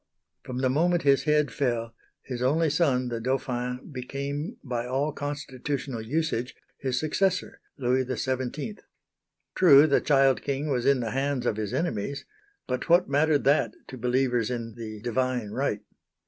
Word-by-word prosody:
From 125 0 -5
the 130 - +2
moment 170 +4 +2
his 140 -1 +4
head 150 -1 +2
fell, 120 -4 -1 0.3
his 125 -2 -5
only 150 +5 +2
son 135 -6 +2
the 115 -1 -3
Dauphin 125 0 -2
became 140 - -4
by 125 -2 -3
all 135 +4 0
constitutional 140 -3 -4
usage, 130 0 -2 0.2
his 130 -2 -1
successor, 180 +4 0 0.2
Louis 130 -1 +1
XVII. 130 - -3 0.7
True 145 -5 +7
the 140 -3 +3
child 135 -2 +3
king 140 +1 -2
was 125 -2 0
in 140 -2 +4
the 115 -2 -3
hands 135 -1 -1
of 110 - 0
his 105 -2 -3
enemies; 140 - -2 0.4
but 125 +6 -3
what 175 -1 +5
mattered 145 +1 +3
that 140 +2 +3 0.2
to - - -7
believers 125 -1 +1
in 115 -2 -4
the 110 -2 -8
"Divine 125 -2 -1
Right." - - -1
130 Hz, 150 wpm, -27 LUFS, 125-145 Hz, 0.7 s, True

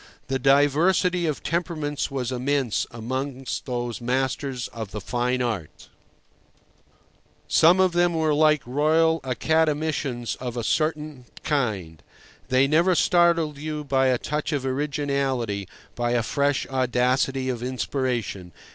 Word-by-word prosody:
The 135 0 0
diversity 155 +6 +3
of 150 - -3
temperaments 160 -4 -2
was 130 -3 -3
immense 130 -1 0
amongst 130 +4 -4
those 120 -2 -3
masters 130 +1 -1
of 110 -3 -7
the 105 - -6
fine 125 +2 -1
art. 105 -11 -5 1.6
Some 175 +4 +5
of 185 -1 +4
them 175 0 +2
were 160 -1 +2
like 150 -1 +3
Royal 160 +5 +2
Academicians 150 -3 0
of 125 -1 -5
a 120 - -2
certain 150 -1 -1 0.2
kind. 100 - -2 0.5
They 130 +1 +3
never 170 +6 +3
startled 170 -3 +3
you 150 0 -4
by 135 -2 +2
a 130 -1 +3
touch 150 +4 -3
of 140 -3 -2
originality, 135 -7 -1 0.3
by 120 0 -1
a 120 -1 +1
fresh 140 +2 0
audacity 130 +1 +1
of 125 -3 -2
inspiration. 125 -7 -3
135 Hz, 125 wpm, -24 LUFS, 125-155 Hz, 1.6 s, Some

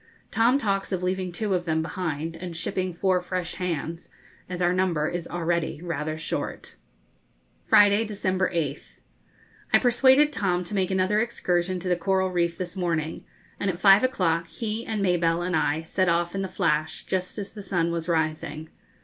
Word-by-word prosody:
Tom 235 +4 +4
talks 200 -7 -1
of 185 -1 -2
leaving 185 0 -1
two 200 +3 -1
of 175 -1 0
them 160 -1 0
behind, 160 -2 -3
and 170 0 -6
shipping 185 +2 -1
four 180 +1 +1
fresh 180 -1 -3
hands, 170 -1 -3 0.4
as 180 -1 -4
our 175 0 +2
number 180 -5 +1
is 175 0 -4
already 170 -2 -1
rather 155 -2 -3
short. 160 - -4 0.9
Friday, 205 0 +6
December 190 -3 -1
8th. 155 -5 -4 0.7
I - - +7
persuaded 265 +4 +4
Tom 180 -6 0
to 175 - -6
make 190 -2 +1
another 190 +2 +2
excursion 185 -5 0
to 185 - -5
the 180 - +3
coral 190 +2 +1
reef 170 -1 0
this 180 -2 -5
morning, 165 -4 -2 0.3
and 200 - 0
at 175 - -2
five 195 +2 +7
o'clock 170 -10 +1
he 215 +7 -4
and 215 -2 -1
Mabelle 175 -2 +2
and 180 -1 0
I 155 0 +1
set 185 +2 0
off 170 0 +1
in 195 - -2
the 190 - -2
'Flash,' 155 -3 -1
just 185 +1 -2
as 200 -1 -6
the 210 - -8
sun 175 -3 0
was 170 0 -3
rising. 155 -1 -1
180 Hz, 175 wpm, -26 LUFS, 165-195 Hz, 0.9 s, I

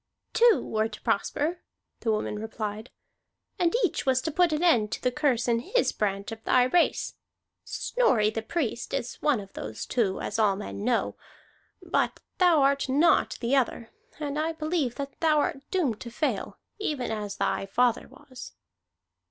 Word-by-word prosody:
"Two 470 -2 +5
were 220 0 0
to 210 -1 -11
prosper," 310 - 0 0.4
the 225 - -2
woman 215 -1 -2
replied. 215 0 -5 0.7
"And 350 +3 +2
each - - -2
was 260 -2 +3
to 320 - -1
put 350 +2 +3
an 305 +2 0
end 230 -12 +4
to - - -4
the 250 - +2
curse 255 -4 +1
in 230 -1 +2
his 420 - +1
branch 200 0 -2
of 225 0 -8
thy 255 - +4
race. 335 +8 +2 0.5
Snorri 235 - +1
the 225 - -3
Priest 240 -1 -2
is 245 -3 -4
one 295 -6 +2
of 195 -1 -11
those 110 0 -6
two, 215 -7 0
as - - -3
all 205 -3 +4
men 205 0 -6
know. 240 0 0 0.7
But - - 0 0.2
thou 345 -6 +5
art 280 0 +2
not 305 +6 +3
the 240 +3 +2
other; 240 -3 0 0.3
and 295 -1 -3
I 320 +1 0
believe 310 -5 -1
that 280 -1 -6
thou 315 -2 +3
art 275 -2 0
doomed 295 - 0
to 245 - -6
fail, 295 +6 -2 0.2
even 285 - -2
as 210 -2 -4
thy 195 - -1
father 245 +3 +1
was." 260 -3 -12
250 Hz, 170 wpm, -27 LUFS, 220-305 Hz, 0.7 s, Two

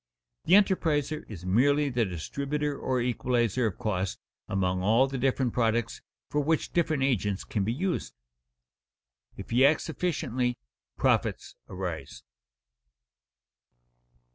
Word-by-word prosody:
The 180 - +6
enterpriser 160 -7 +2
is 90 -5 -8
merely 140 +9 +3
the 120 -2 +1
distributor 140 - -3
or 130 -2 -1
equalizer 120 -1 +1
of 100 - -5
cost 95 -3 -2 0.3
among 95 -1 0
all 110 +7 +4
the 135 -1 -4
different 130 -1 +1
products 115 -1 0 0.3
for 150 - 0
which 160 +2 0
different 155 -5 +1
agents 105 -7 0
can 105 - -2
be 105 - 0
used. 160 - -2 1.2
If - - -9
he 125 +3 +4
acts 155 +3 +3
efficiently, 130 -8 -1 0.4
profits - - 0
arise. 90 -7 -6
125 Hz, 115 wpm, -28 LUFS, 105-145 Hz, 1.2 s, The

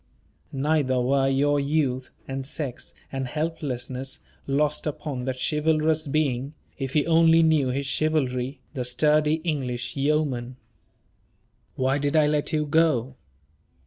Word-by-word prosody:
Neither 140 -2 +1
were 135 +2 +2
your 145 +2 +2
youth, 140 -3 0 0.2
and 135 0 -4
sex, 135 -2 -6 0.2
and 135 -1 -3
helplessness, 135 -3 -3 0.3
lost 150 +3 0
upon 140 -4 -4
that 130 -1 -3
chivalrous 155 0 +1
being 140 -1 -1 0.2
if 135 -1 -3
he 150 - +2
only 165 0 +5
knew 155 -4 +3
his 135 +2 -1
chivalry 135 -3 0
the 130 -4 -2
sturdy 150 +5 +3
English 130 -7 -2
yeoman. 135 -4 0 1.2
Why 130 +2 +1
did 145 +2 -1
I 155 -1 +5
let 150 0 0
you 150 -1 +1
go? 145 -5 +2
140 Hz, 125 wpm, -25 LUFS, 130-155 Hz, 1.2 s, only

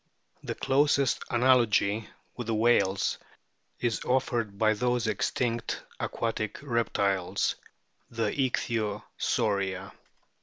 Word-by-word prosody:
The - - -4
closest 140 -1 +2
analogy 115 -4 +3 0.3
with 120 -2 -5
the 115 - 0
whales 110 -4 +2 0.6
is 115 -5 -1
offered 120 -5 0
by 110 +1 +3
those 125 +2 0
extinct 115 +2 -1 0.2
aquatic 110 -2 -2
reptiles, 100 -7 0 0.6
the 115 -1 -1
Ichthyosauria. 105 -6 -1
115 Hz, 85 wpm, -28 LUFS, 105-125 Hz, 0.6 s, analogy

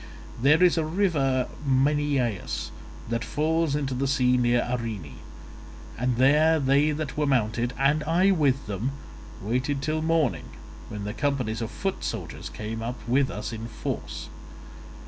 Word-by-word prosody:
There 150 +6 +5
is 175 -2 +5
a - - +1
river 155 -7 +1 0.2
Minyeius 135 -4 0 0.4
that 115 +1 -1
falls 155 +1 0
into 140 -3 -1
the 135 +2 -1
sea 125 -2 +3
near 120 -1 +2
Arene, 110 - -4 0.8
and 125 +1 0
there 150 +6 +4
they 140 +2 +3
that 150 -1 -3
were 150 -1 +1
mounted 120 -2 +1
(and 145 +3 +2
I 180 +5 +3
with 145 -6 +2
them) 110 +6 -3 0.5
waited 130 +6 -1
till 155 0 0
morning, 155 - +1 0.4
when 105 -1 -6
the 105 +1 -4
companies 125 -5 -1
of 115 - -3
foot 195 +10 -3
soldiers - - -5
came 110 +1 -5
up 120 +2 -4
with 130 +2 +3
us 105 +2 -5
in 115 +1 -5
force. 115 - -5
135 Hz, 145 wpm, -26 LUFS, 120-150 Hz, 0.8 s, There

